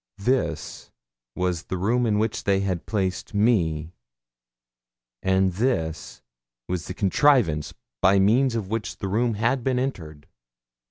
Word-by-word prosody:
This 100 -7 -2 0.5
was 90 -2 -2
the 95 - -4
room 115 +6 +1
in 105 -2 +1
which 110 +1 -1
they 95 -1 +2
had 95 -4 -3
placed 95 -1 -2
me, 85 -8 +1 1.3
and 95 -1 +2
this 90 -7 -2 0.4
the 90 0 -4
contrivance 95 - +2 0.3
by 95 +1 +5
means 115 +6 +3
of 110 -4 -2
which 110 -1 -3
the 100 - -4
room 115 +3 0
had 115 +4 0
been 130 0 0
entered. 80 - -4
100 Hz, 125 wpm, -24 LUFS, 90-115 Hz, 1.3 s, by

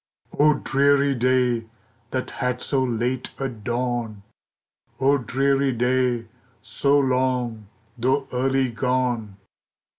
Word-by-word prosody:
OH, 150 +1 +6
dreary 140 +1 +3
day, 125 -2 +1 0.4
that 130 +1 -3
had 125 -1 0
so 135 0 +1
late 125 +1 -1
a 135 - -2
dawn! 120 -2 -3 0.8
Oh, 140 +2 +3
dreary 135 +2 +1
day, 125 0 +1 0.3
so 140 +6 +1
long, 125 -5 0 0.3
though 135 +3 +1
early 130 0 +1
gone! 120 -4 -1
125 Hz, 100 wpm, -23 LUFS, 120-135 Hz, 0.8 s, OH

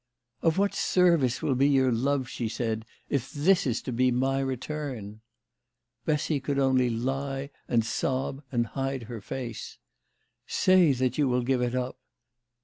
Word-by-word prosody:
" 120 - -57
Of 165 0 +2
what 200 +1 +2
service 170 -9 +2
will 140 - +2
be 135 +3 +3
your 130 -2 +4
love," 130 +3 0
she 120 -2 -3
said, 110 -1 -2 0.2
"if 135 -1 -2
this 160 +3 +3
is 120 -2 -1
to - - -4
be 125 +2 +3
my 135 +2 +1
return? 130 -5 -4 0.4
" 120 0 -54
Bessy 150 -1 +1
could 140 +1 -2
only 130 -2 +3
lie 135 +4 -2 0.2
and 115 -2 +2
sob 135 +3 -1
and 120 -2 +1
hide 135 +1 -3
her 115 -1 -7
face. 120 0 -6 0.4
" - - -45 0.2
Say 185 -4 +4
that 130 +1 -1
you 145 - +4
will 125 -1 +1
give 130 0 +1
it 125 0 0
up." 130 0 -3
130 Hz, 170 wpm, -28 LUFS, 120-140 Hz, 0.4 s, your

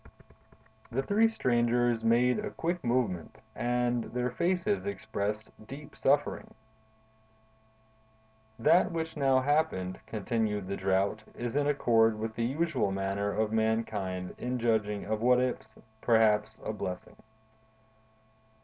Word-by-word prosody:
The 135 +3 0
three 215 +8 +4
strangers 120 - +1
made 120 - +3
a 210 0 -3
quick 175 +1 -3
movement, 120 -9 -1 0.2
and 120 0 0
their 125 0 -2
faces 185 - 0
expressed 105 - -3 0.2
deep 145 +2 -10
suffering. - - 0 2.0
"That 175 +10 +4
which 160 -1 -3
now 135 -3 +3
happened," 140 -11 0
continued 110 -2 -1
the 100 - -2
Drought, 95 +3 0
"is 120 +1 -4
in 145 0 +2
accord 115 -6 +3
with 110 +1 -4
the 115 +1 -1
usual 150 -4 0
manner 95 +1 -1
of 110 +1 0
mankind 110 -5 -1
in 125 +1 -2
judging 110 -3 0
of 110 +1 -2
what 125 +1 +5
is, 125 -3 -2 0.3
perhaps, 110 -1 +3
a - - -2
blessing. 90 -3 -6
115 Hz, 120 wpm, -30 LUFS, 105-130 Hz, 2.0 s, what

